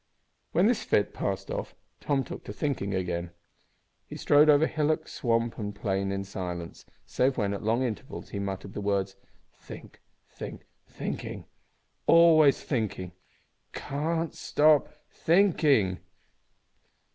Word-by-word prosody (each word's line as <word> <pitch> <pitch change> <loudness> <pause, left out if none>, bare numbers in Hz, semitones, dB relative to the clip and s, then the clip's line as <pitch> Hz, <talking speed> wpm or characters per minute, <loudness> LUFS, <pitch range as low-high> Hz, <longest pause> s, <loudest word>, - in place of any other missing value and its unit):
When 180 - +3
this 225 0 +2
fit 105 - +1
passed 95 -1 -3
off - - -5 0.2
Tom 140 -2 0
took - - -8
to 105 - -6
thinking 105 -7 -2
again. 90 -2 -2 0.8
He - - -8
strode 150 +1 +5
over 150 +1 +6
hillock, 155 -1 0
swamp, 115 -1 -1
and 105 -1 -4
plain 95 -1 -1
in 100 0 -2
silence, 90 -3 -6 0.2
save 130 +1 0
when, 100 -2 0
at 100 - -5
long 115 +4 +1
intervals, 130 +3 -5
he 100 - -5
muttered 100 0 -5
the - - -5
words, 100 -1 -1 0.4
"Think, - - -12 0.3
think, - - -9 0.2
thinking. - - -6 0.6
Always 160 -4 +6
thinking! 105 - -2 0.6
Can't 160 +3 -2
stop 150 -1 +3 0.2
think, 180 +2 +3
thinking!" 105 - +3
115 Hz, 130 wpm, -28 LUFS, 100-150 Hz, 0.8 s, over